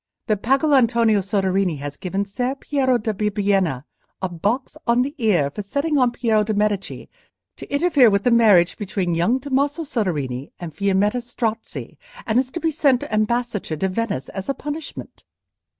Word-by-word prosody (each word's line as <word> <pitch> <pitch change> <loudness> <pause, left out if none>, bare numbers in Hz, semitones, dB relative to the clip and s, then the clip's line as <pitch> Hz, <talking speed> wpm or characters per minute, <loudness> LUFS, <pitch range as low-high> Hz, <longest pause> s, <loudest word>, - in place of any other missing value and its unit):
—that 210 -3 0
Pagolantonio 240 -5 +3
Soderini 190 -3 0
has 140 0 -6
given 195 +4 -3
Ser 245 +6 -2
Piero 270 -3 +1
da 220 -1 -2
Bibbiena 195 -8 0 0.4
a 190 - -1
box 205 +9 -2
on 240 +1 +4
the 280 +2 -4
ear 180 - +2
for 210 - -5
setting 285 +8 -1
on 250 -1 +4
Piero 225 -3 +1
de' 215 0 -2
Medici 205 -1 -1 0.5
to - - -11
interfere 285 -4 +4
with 200 -1 +1
the 245 - +3
marriage 210 -7 +4
between 190 -4 -2
young 175 +10 +2
Tommaso 285 +4 -1
Soderini 150 - -2
and 170 -3 -7
Fiammetta 200 +6 +1
Strozzi, 230 -2 -4 0.3
and 225 +2 +2
is 255 0 -1
to 340 - -5
be 325 -1 0
sent 280 -4 +2
ambassador 215 -4 -1
to 190 - 0
Venice 190 - -3
as 195 +4 -6
a 275 - 0
punishment?" 295 +1 -7
215 Hz, 165 wpm, -21 LUFS, 195-255 Hz, 0.5 s, on